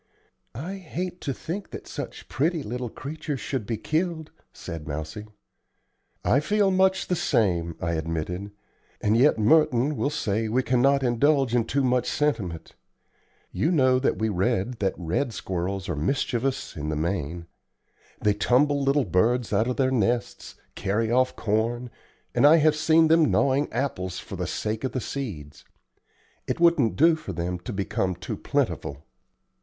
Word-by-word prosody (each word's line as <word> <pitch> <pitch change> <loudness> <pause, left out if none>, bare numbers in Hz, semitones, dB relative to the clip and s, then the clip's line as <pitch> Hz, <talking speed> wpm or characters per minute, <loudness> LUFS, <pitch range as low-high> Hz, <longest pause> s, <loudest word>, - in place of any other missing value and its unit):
"I 175 +11 -5
hate 180 0 -5
to 140 - -2
think 170 +9 -5
that - - -8
such - - -7
pretty 155 +4 0
little 125 +1 -4
creatures 145 +2 -5
should 130 -7 -3
be 115 - -2
killed," 160 - -2 0.2
said 80 -2 -8
Mousie. 80 +8 -5 1.0
"I 135 - +4
feel 205 +5 +2
much 190 0 +3
the 180 - 0
same," 85 - +1
I 85 - -1
admitted; 80 +4 -3 0.5
"and 105 +1 +2
yet 130 +4 +4
Merton 145 +3 +3
will 140 - 0
say 110 -6 -1
we 130 +4 +1
cannot 135 +3 +3
indulge 135 +1 +2
in 120 -2 +2
too 140 +3 0
much 125 -1 +1
sentiment. 100 - -2 0.8
You 155 - 0
know 130 -6 +4
that 130 - +1
we 110 - 0
read 95 +4 0
that 95 -2 0
red 90 - -1
squirrels 95 +1 -3
are 85 - -2
mischievous 130 - -1
in 75 -1 -4
the 80 - -1
main. 85 0 -2 0.7
They 105 - +2
tumble 140 +7 +2
little 140 0 +2
birds 110 +6 +1
out 110 +4 +2
of 125 - -2
their 130 -1 +2
nests, 120 0 -1 0.2
carry 110 +3 -1
off 130 +1 +2
corn, 115 +3 -1 0.4
and 145 - +5
I 155 - +8
have 155 -1 +4
seen 160 +1 +4
them 160 -1 +4
gnawing 140 +2 +2
apples 115 -8 -2
for - - -7
the - - -3
sake 110 +2 -3
of 130 - -2
the 130 - -1
seeds. 90 - -6 0.8
It - - -2
wouldn't 170 -9 +4
do 165 +2 +5
for 155 -11 -7
them 90 +1 -3
to 90 - -7
become 95 -2 -1
too 90 - -5
plentiful. 70 +2 -2
120 Hz, 160 wpm, -25 LUFS, 95-145 Hz, 1.0 s, I